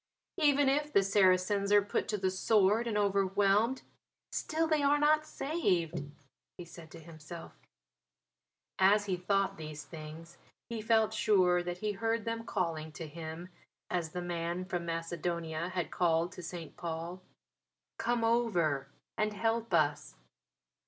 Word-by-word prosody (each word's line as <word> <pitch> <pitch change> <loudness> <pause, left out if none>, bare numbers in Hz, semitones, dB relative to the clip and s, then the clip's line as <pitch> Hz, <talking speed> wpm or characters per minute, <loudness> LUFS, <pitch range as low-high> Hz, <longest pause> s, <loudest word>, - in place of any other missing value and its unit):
"Even 290 -2 +4
if 295 +2 +1
the 200 - +4
Saracens 195 +1 +3
are 205 -1 +6
put 205 - -2
to 210 - -1
the 190 -1 0
sword 210 +3 +3
and 215 -2 -1
overwhelmed, 200 +4 +2 0.5
still 320 +1 -1
they 310 -2 +2
are 285 +1 +4
not 305 +1 +3
saved," 175 - -1 0.5
he 175 - -8
said 170 -1 -12
to 165 - -11
himself. 165 +1 -10 1.3
As 205 +2 +5
he 190 -2 0
thought 195 +2 0
these 155 -1 -7
things 160 +1 -10 0.3
he 230 -2 -4
felt 220 0 +3
sure 185 -5 +3
that 175 0 -4
he 210 +3 -2
heard 225 +2 -1
them 230 0 -3
calling 165 -5 -2
to 165 - -6
him 160 +3 -7 0.4
(as 175 -3 -1
the 180 +2 -5
Man 175 +1 -3
from 175 -2 -3
Macedonia 165 0 -3
had 180 -2 -3
called 170 0 +1
to 180 - -9
St. 170 -1 -7
Paul) 170 +2 -5 0.8
"Come 235 0 0
over 180 - +1 0.3
and 215 0 +1
help 225 +1 -1
us." 155 -4 +1
185 Hz, 145 wpm, -32 LUFS, 170-220 Hz, 1.3 s, are